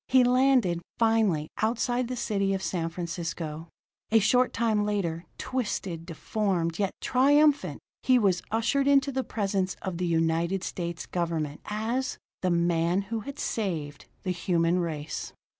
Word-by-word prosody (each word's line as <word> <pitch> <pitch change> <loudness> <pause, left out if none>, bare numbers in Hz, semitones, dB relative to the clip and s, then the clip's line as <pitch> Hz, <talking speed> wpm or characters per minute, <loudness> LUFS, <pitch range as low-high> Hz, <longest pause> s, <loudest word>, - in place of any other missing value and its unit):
He 260 -1 +5
landed, 250 -8 +3 0.2
finally, 220 -9 +2
outside 240 +2 +1
the 255 - -3
city 200 -5 0
of 190 - -4
San 165 -4 -1
Francisco. 165 -2 -5 0.4
A 225 - +6
short 250 +4 +4
time 220 -3 +1
later, 180 -5 -1
twisted, 195 -9 -3
deformed, 170 -1 -1
yet 195 -2 0
triumphant, 290 +3 +3 0.2
he 255 -1 +4
was 195 -6 +2
ushered 230 +6 +1
into 280 0 +4
the 265 0 -1
presence 195 -4 -1
of 180 -3 -3
the 180 - 0
United 165 +3 +1
States 170 -3 -4
government 165 -4 -2
as 230 +6 -2 0.2
the 185 - +1
man 170 +2 +2
who 225 - 0
had 280 +6 -7
saved 160 - -3 0.2
the 185 - -1
human 175 0 +1
race. 155 -3 -4
195 Hz, 140 wpm, -28 LUFS, 170-235 Hz, 0.4 s, A